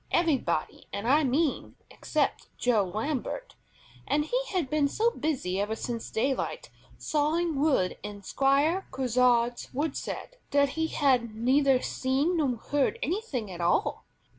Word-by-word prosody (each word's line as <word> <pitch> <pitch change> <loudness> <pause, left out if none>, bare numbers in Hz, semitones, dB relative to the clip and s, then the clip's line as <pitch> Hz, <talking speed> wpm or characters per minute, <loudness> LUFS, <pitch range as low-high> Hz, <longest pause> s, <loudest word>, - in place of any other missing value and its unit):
Everybody, 325 -6 0
I 250 +10 +2
mean, 280 +2 0 0.2
except - - -1
Joe 225 -5 +2
Lambert, 290 - -3 0.5
and 295 +1 +1
he - - -1
had 365 - -1
been 295 +1 +2
so 450 +11 +1
busy 250 - -1
ever 210 +2 -1
since 230 0 -4
daylight, 265 +4 -2 0.3
sawing 315 +2 0
wood 275 -12 +2
in 205 0 -8
Squire 280 - +2
Grisard's 245 -2 +1
woodshed, 310 - -3
that 285 0 +3
he 320 +3 -1
had 250 -8 +1
neither 260 +3 +3
seen 275 +7 0
nor 275 -6 +1
heard 290 - 0
anything 315 - -2
at 175 -1 -6
all. 170 +1 +1
275 Hz, 130 wpm, -28 LUFS, 235-315 Hz, 0.5 s, that